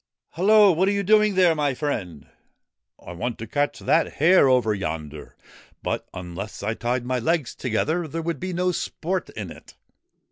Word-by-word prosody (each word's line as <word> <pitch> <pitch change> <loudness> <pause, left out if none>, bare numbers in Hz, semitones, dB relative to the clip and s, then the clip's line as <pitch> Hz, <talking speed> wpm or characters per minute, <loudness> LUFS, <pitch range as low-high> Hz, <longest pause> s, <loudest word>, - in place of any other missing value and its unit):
' - - -65
Hello! 205 +3 +5
What 180 +3 +1
are - - +3
you 200 0 -1
doing 210 0 +4
there, 180 -3 +5
my 145 -4 0
friend? 100 - -4 0.3
' - - -55
' - - -27
I - - -6
want 115 +7 -4
to 115 - -6
catch 145 +6 -1
that 165 - +1
hare 160 -2 +5
over 125 -4 +3
yonder; 80 -6 -6 0.5
but - - -3
unless 90 +3 -7
I 110 +2 -1
tied 120 +2 -2
my 130 0 -1
legs 155 0 0
together 155 +8 -1
there 165 +2 -5
would 165 -3 -3
be 185 +1 -4
no 180 +1 0
sport 180 +1 -3
in 100 -6 -7
it.' - - -14
145 Hz, 190 wpm, -24 LUFS, 110-180 Hz, 0.5 s, Hello